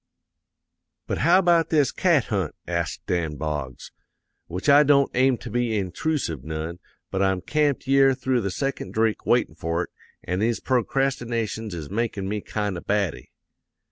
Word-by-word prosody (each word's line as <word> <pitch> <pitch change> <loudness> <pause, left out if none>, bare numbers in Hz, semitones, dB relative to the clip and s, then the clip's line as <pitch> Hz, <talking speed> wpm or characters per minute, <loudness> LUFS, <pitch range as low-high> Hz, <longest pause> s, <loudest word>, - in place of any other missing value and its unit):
"'But - - -3
how 170 +7 +5
about 170 -3 +3
this 145 -5 +3
cat 170 - +3
hunt?' 95 -7 -1
asks - - -2
Dan 85 -4 -1
Boggs. 75 -4 -5 0.6
'Which 90 - -5
I 145 0 +8
don't 140 -1 +4
aim 130 0 +3
to 120 - -9
be 120 -2 0
introosive 95 - -2
none, 80 +3 -5 0.3
but 95 - -1
I'm 95 -1 +2
camped 145 +5 0
yere 135 0 +4
through 130 -1 0
the 100 - -2
second 100 -1 -3
drink 110 -1 0
waitin' - - +2
for 85 +1 -2
it, - - -9 0.3
an' 90 +2 -2
these 115 +2 +1
procrastinations 120 -5 -1
is 80 -2 -7
makn' 105 -3 -2
me 105 +1 -2
kind 105 -4 -3
o' - - -13
batty.' 100 -7 -1
110 Hz, 160 wpm, -24 LUFS, 90-135 Hz, 0.6 s, I